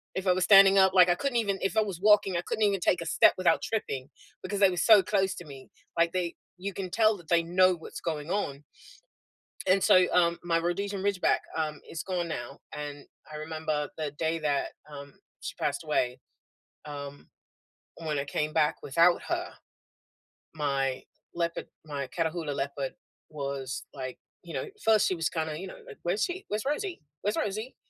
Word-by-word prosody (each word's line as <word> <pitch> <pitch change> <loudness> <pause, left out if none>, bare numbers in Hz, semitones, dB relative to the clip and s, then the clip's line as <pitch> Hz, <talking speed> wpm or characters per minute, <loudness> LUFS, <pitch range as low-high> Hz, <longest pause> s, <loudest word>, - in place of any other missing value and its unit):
If 190 - -3
I 185 - +6
was 185 0 0
standing 195 -1 +8
up, 190 0 +5
like, 180 -1 +7
I - - +6
couldn't 270 +2 -1
even 200 -4 0
if 195 +3 -1
I 220 - +6
was 195 -5 -3
walking, 205 -2 +5
I - - 0
couldn't 215 +5 -2
even 200 -2 +3
take 180 0 +2
a - - -4
step - - +5
without 185 -2 +3
tripping 140 -11 -3 0.3
because 200 +1 -3
they 195 - +6
were 180 - -4
so 210 +1 +7
close 195 -2 +1
to 175 - -9
me. 135 -3 -12 0.3
Like, 170 0 +3
they 175 -2 -1 0.2
you 195 +2 -5
can 190 -1 -5
tell 215 +1 +3
that 170 -4 -16
they 170 -1 +4
know 185 +2 +4
what's 165 - -9
going 155 -2 -3
on 145 -8 -2 1.0
and 185 +1 +4
so 185 0 +6
um, 170 -1 +3
my 165 -1 +1
Rhodesian 195 +3 -2
Ridgeback, 200 -3 +2 0.2
um, 155 -2 -2
is 160 - -5
gone 180 -2 -2
now, 140 -4 -6 0.2
and 145 -1 -6 0.3
I 150 - -6
remember 155 -2 -3
the 155 -2 -3
day 165 +1 0
that, 145 -3 0 0.2
um, 140 -1 -9 0.3
she - - -5
passed - - -1
away. 125 +1 0 0.7
Um, 145 -1 -8 0.7
when 150 -3 -1
I 140 - -1
came 150 +1 -2
back 155 -2 +2
without 170 +5 +4
her, - - -1 1.1
my 135 -3 -1 0.3
leopard 170 -1 -2 0.2
my 140 -3 -4
Catahoula 160 +1 -2
Leopard 140 -1 -3 0.4
was, 140 -3 -4
like, 130 -2 -6 0.3
you - - -9
know, - - -2 0.2
first, 220 -2 +4
she 185 - 0
was 165 -1 0
kinda, 160 -2 -3
you 190 - -6
know, - - -10
like, - - -11
"Where's 175 +5 0
she? 375 +1 -3
Where's 210 +4 -3
Rosie? 345 +6 -2 0.2
Where's 205 +1 -1
Rosie? 215 +5 -3
170 Hz, 190 wpm, -28 LUFS, 150-195 Hz, 1.1 s, standing